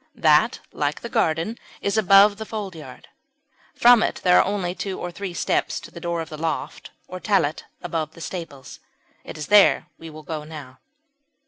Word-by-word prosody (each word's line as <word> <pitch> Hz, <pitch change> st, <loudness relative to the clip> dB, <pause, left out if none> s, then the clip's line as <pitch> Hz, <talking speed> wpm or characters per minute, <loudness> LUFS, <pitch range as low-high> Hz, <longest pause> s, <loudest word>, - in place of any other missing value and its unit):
That, -, -, +3 dB
like -, -, -2 dB
the -, -, -6 dB
garden, 165 Hz, +9 st, 0 dB, 0.2 s
is 200 Hz, -, -1 dB
above 200 Hz, -1 st, +6 dB
the 220 Hz, -, -6 dB
foldyard; 195 Hz, -7 st, -8 dB, 0.7 s
from 240 Hz, -1 st, +6 dB
it -, -, 0 dB
there 180 Hz, -1 st, +5 dB
are -, -, +5 dB
only 190 Hz, -3 st, -2 dB
two 190 Hz, +1 st, -5 dB
or 175 Hz, -, -5 dB
three 195 Hz, +1 st, -6 dB
steps 175 Hz, -, -1 dB
to -, -, -13 dB
the 170 Hz, -, -10 dB
door 170 Hz, -1 st, -2 dB
of 160 Hz, -, -7 dB
the 155 Hz, -, -8 dB
loft 165 Hz, -, -4 dB, 0.2 s
or 185 Hz, -, -7 dB
"tallet" 180 Hz, -7 st, 0 dB, 0.2 s
above 160 Hz, -3 st, -3 dB
the -, -, -13 dB
stables. 155 Hz, -6 st, -8 dB, 0.4 s
It -, -, -9 dB
is 150 Hz, -, -5 dB
there 205 Hz, -1 st, +5 dB
that -, -, -31 dB
we 165 Hz, -, -9 dB
will 155 Hz, 0 st, -11 dB
go 155 Hz, -1 st, -5 dB
now. 145 Hz, -5 st, -11 dB
175 Hz, 190 wpm, -23 LUFS, 160-200 Hz, 0.7 s, above